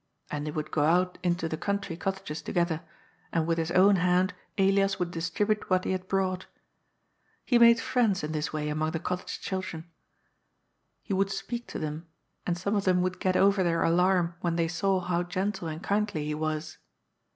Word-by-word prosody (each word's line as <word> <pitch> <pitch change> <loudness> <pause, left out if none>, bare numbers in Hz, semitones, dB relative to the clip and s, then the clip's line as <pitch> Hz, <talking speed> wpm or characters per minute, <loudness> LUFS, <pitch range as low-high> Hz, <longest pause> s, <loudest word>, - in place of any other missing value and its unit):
And 150 0 -3
they - - -2
would 155 0 -4
go 145 - +1
out 180 +4 +2
into 175 -2 0
the 160 - -3
country 200 -1 -2
cottages 190 -4 -4
together, 170 0 0 0.5
and 165 -2 +1
with 165 0 0
his 165 0 -1
own 190 +3 +5
hand 180 +1 +2 0.2
Ellas 195 0 +3
would 180 -2 -2
distribute 205 +5 -1
what 185 -1 +3
he - - 0
had 185 0 -3
brought. 185 -1 -1 1.0
He 245 -2 +4
made 235 0 +7
friends 225 -9 +1
in 150 - -3
this 155 0 -2
way 150 -1 -2
among 155 +1 0
the 165 - -1
cottage 180 +2 -4
children. 175 -3 -5 1.1
He 205 - -3
would 195 +1 +2
speak 235 +5 -4
to - - -6
them, 155 +2 -4 0.4
and 175 -1 0
some 200 +4 -1
of 200 - 0
them 180 -1 +3
would 185 0 -2
get 185 -1 +1
oyer 195 0 +4
their 165 -1 +1
alarm 175 0 +3
when 170 -1 0
they 165 -1 +1
saw 185 +3 +1
how 175 -1 0
gentle 185 +1 -2
and 160 +2 -6
kindly 205 -7 0
he 150 - -2
was. 155 0 -3
180 Hz, 190 wpm, -28 LUFS, 165-195 Hz, 1.1 s, made